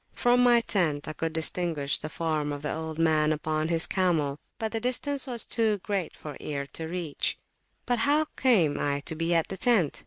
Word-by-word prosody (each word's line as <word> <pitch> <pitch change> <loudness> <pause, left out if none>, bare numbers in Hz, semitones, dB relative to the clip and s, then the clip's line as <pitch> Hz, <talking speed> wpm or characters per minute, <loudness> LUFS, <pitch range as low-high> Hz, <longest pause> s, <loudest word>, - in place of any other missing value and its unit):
From 245 0 +3
my 240 -1 +5
tent 160 -10 0
I 155 - -4
could 165 +1 -2
distinguish 160 -3 0
the 155 - -6
form 155 -2 -1
of 145 0 -5
the 150 - -2
old 160 0 -5
man 155 -2 +3
upon 155 0 -1
his 165 0 +1
camel, 160 -7 0 0.2
but 220 -2 -3
the 225 - -2
distance 265 +4 0
was 240 -3 0
too 220 -2 +1
great 195 -5 -2
for 150 -3 -8
ear 140 -2 -4
to 160 - -4
reach. 170 -3 -2 0.5
But 245 -1 0
how 295 +6 +3
came 175 - +3
I 145 0 0
to 155 - -2
be 165 +2 0
at 165 - +2
the 190 - -5
tent? 195 - +2
165 Hz, 205 wpm, -27 LUFS, 155-220 Hz, 0.5 s, my